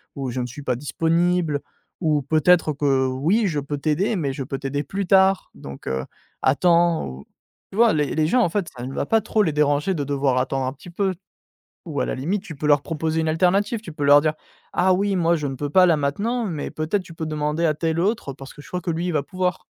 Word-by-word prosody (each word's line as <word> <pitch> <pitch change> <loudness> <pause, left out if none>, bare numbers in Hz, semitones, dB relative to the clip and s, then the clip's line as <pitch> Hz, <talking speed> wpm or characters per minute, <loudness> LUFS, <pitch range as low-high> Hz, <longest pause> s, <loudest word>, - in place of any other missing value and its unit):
ou: 135 -2 -3
«Je 125 - -3
ne 125 - -1
suis 125 +4 -8
pas 125 -3 -1
disponible» 165 +2 +1 0.4
ou 155 -4 +1
«Peut-être 160 +3 +3
que 135 -2 +1
oui 165 - +1
je 155 -5 -1
peux 145 +1 -4
t'aider, 160 +9 0
mais 150 -7 -1
je 135 0 -4
peux 135 +1 -5
t'aider 140 +1 -2
plus 195 +7 -3
tard 190 0 +4
donc, 70 0 -10
heu, 65 0 -2 0.4
attends» 170 +4 +3
ou 65 +1 -9 0.5
tu - - -10
vois? 230 0 +6
Les 150 -2 0
les 155 0 +2
gens 250 +10 +3
en - - +3
fait, 195 0 -2
ça 120 - -5
ne 135 - -6
va - - -2
pas 225 +8 +3
trop 215 -1 +1
les 165 - +1
déranger 150 +4 +1
de 150 -5 -2
devoir 135 -2 0
attendre 130 +1 0
un - - -1
petit 145 +5 -13
peu, 190 +2 -1 0.7
ou 150 -4 -4
à - - +2
la - - -2
limite 180 +10 -2
tu 185 -7 -9
peux 150 - -3
leur 145 -1 +4
proposer 160 +1 -2
une 160 - -1
alternative, 190 +7 +1
tu 195 - -9
peux 145 -1 -4
leur 145 +1 +7
dire: 155 0 0 0.4
«Ah 185 +1 +3
oui, 195 +1 +1
moi 170 -1 +3
je 150 -2 -3
ne 135 - -3
peux 145 +2 -4
pas 185 +4 +6
là 170 -3 +4
maintenant, 205 +13 -1
mais 165 -8 -4
peut 155 0 -4
être 205 - +2
tu 170 -2 -13
peux 160 - -4
demander 155 +1 -1
à 160 - +3
tel 160 +1 -1
autre 195 - -1
parce 135 0 -11
que - - -14
je - - -15
crois 180 0 -4
que 170 - -2
lui, 170 +2 -2
il 180 - -1
va 150 -3 +1
pouvoir». 180 +5 -2
155 Hz, 255 wpm, -23 LUFS, 140-180 Hz, 0.7 s, leur